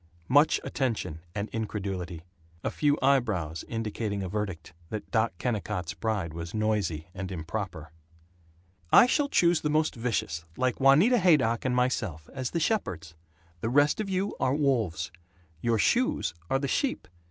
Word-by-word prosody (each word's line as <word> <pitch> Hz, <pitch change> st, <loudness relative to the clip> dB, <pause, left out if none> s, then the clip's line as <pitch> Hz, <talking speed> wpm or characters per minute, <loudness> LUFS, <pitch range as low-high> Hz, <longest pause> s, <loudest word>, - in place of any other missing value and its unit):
Much 145 Hz, +4 st, +5 dB
attention 110 Hz, -, -2 dB, 0.2 s
and 100 Hz, +1 st, -2 dB
incredulity. 95 Hz, -6 st, -4 dB, 0.4 s
A -, -, -1 dB
few 145 Hz, -1 st, +2 dB
eyebrows 105 Hz, -, +1 dB
indicating 110 Hz, -3 st, -3 dB
a -, -, -3 dB
verdict 95 Hz, -5 st, -4 dB, 0.2 s
that 110 Hz, -, -6 dB
Doc 115 Hz, 0 st, +2 dB
Kennicott's 100 Hz, -4 st, -2 dB
bride 100 Hz, -7 st, -2 dB
was 85 Hz, +3 st, -6 dB
noisy 100 Hz, -7 st, -1 dB
and 95 Hz, 0 st, -5 dB
improper. 85 Hz, -2 st, -5 dB, 1.0 s
"I -, -, +9 dB
shall 285 Hz, +3 st, +1 dB
choose 170 Hz, -, +3 dB
the 150 Hz, -, 0 dB
most 155 Hz, +1 st, +2 dB
vicious, 115 Hz, -9 st, -2 dB
like 130 Hz, -1 st, 0 dB
Juanita 155 Hz, -, +6 dB
Haydock 140 Hz, -, +3 dB
and 125 Hz, -1 st, +1 dB
myself, 110 Hz, -11 st, -1 dB
as 130 Hz, -2 st, -3 dB
the 170 Hz, -, -1 dB
shepherds. 95 Hz, -, -1 dB, 0.5 s
The 115 Hz, -, -2 dB
rest 145 Hz, -, +3 dB
of 205 Hz, -, -4 dB
you 190 Hz, +2 st, -1 dB
are 130 Hz, -, +2 dB
wolves. 110 Hz, -, 0 dB, 0.5 s
Your 115 Hz, -1 st, +2 dB
shoes 250 Hz, -, +2 dB, 0.2 s
are 135 Hz, -, +3 dB
the 140 Hz, +1 st, -2 dB
sheep. 260 Hz, -, -1 dB
110 Hz, 150 wpm, -28 LUFS, 90-140 Hz, 1.0 s, I